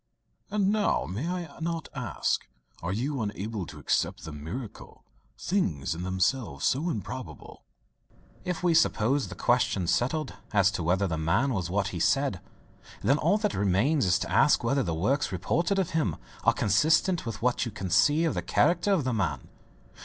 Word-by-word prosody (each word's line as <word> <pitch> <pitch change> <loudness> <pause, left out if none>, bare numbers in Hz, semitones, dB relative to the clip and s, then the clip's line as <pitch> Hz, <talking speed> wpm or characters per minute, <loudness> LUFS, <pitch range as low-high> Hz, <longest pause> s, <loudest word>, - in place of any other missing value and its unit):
"And 200 -1 +1
now, 210 -1 +1
may 115 - -4
I 175 -5 -5
not 165 0 -3
ask - - -2 0.3
are 85 - -3
you 130 +6 -2
able 100 -2 -4
to - - -10
accept - - -1
the 80 - -6
miracles, 85 - -8 0.4
things 85 - -1
in 85 - -6
themselves 95 - -1
so 150 +7 +1
improbable?" 110 - -7 0.8
"If 180 -1 -3
we 175 -2 +3
suppose 140 -4 +2
the - - -8
question 120 -6 +1
settled 130 - 0 0.2
as 100 -1 +4
to 100 - -3
whether 90 +4 +1
the 80 -4 -2
man 115 - +1
was 90 -5 -2
what 100 +2 0
he 90 - -5
said, 135 - +1 0.6
then 135 +8 +3
all 180 +7 +3
that 210 - 0
remains 100 - +2
is 90 -1 +4
to - - -4
ask - - +4
whether 135 0 +2
the 85 -7 -2
works 130 - 0
reported 170 - 0
of 185 -2 0
him 120 - 0 0.3
are - - +5
consistent 155 - +2
with 115 -1 -5
what 125 +1 +1
you - - -5
can 95 -4 -5
see 150 - +4
of 160 - +1
the - - -2
character 170 +6 +2
of 175 -7 +1
the 130 -1 -1
man." 110 -3 -2
120 Hz, 175 wpm, -28 LUFS, 95-160 Hz, 0.8 s, are